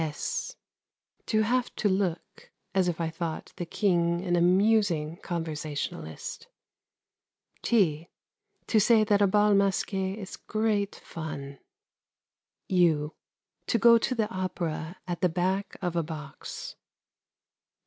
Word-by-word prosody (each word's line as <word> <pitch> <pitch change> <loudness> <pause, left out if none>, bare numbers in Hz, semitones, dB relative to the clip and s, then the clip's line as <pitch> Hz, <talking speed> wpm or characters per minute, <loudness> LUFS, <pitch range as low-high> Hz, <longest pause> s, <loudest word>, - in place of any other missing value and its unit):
(s) 460 - -3 0.7
To 215 -1 +3
have 245 +3 0
to 210 - +1
look 190 -3 -2 0.2
as 190 -2 +3
if 175 -2 -1
I 165 -1 -1
thought 165 -1 -5
the 175 - -4
King 170 -2 +1
an 175 -1 +2
amusing 180 -3 +3
conversationalist. 155 - -5 1.1
(t) 170 -8 +2 0.6
To 220 - +3
say 220 +1 +5
that 205 -1 +3
a 200 - +6
Bal 210 +2 +4
Masqué 195 0 +1
is 195 -4 -7
great 215 -2 0
fun. 140 -4 -7 1.1
(u) 165 -5 +2 0.5
To - - +2
go 235 +1 +7
to 255 +3 -1
the 220 -3 +1
opera 175 -2 -3
at 175 -1 -3
the 180 - +4
back 185 +4 -1
of 175 -1 -1
a 170 - +2
box. 150 -3 -7
180 Hz, 120 wpm, -28 LUFS, 165-205 Hz, 1.1 s, go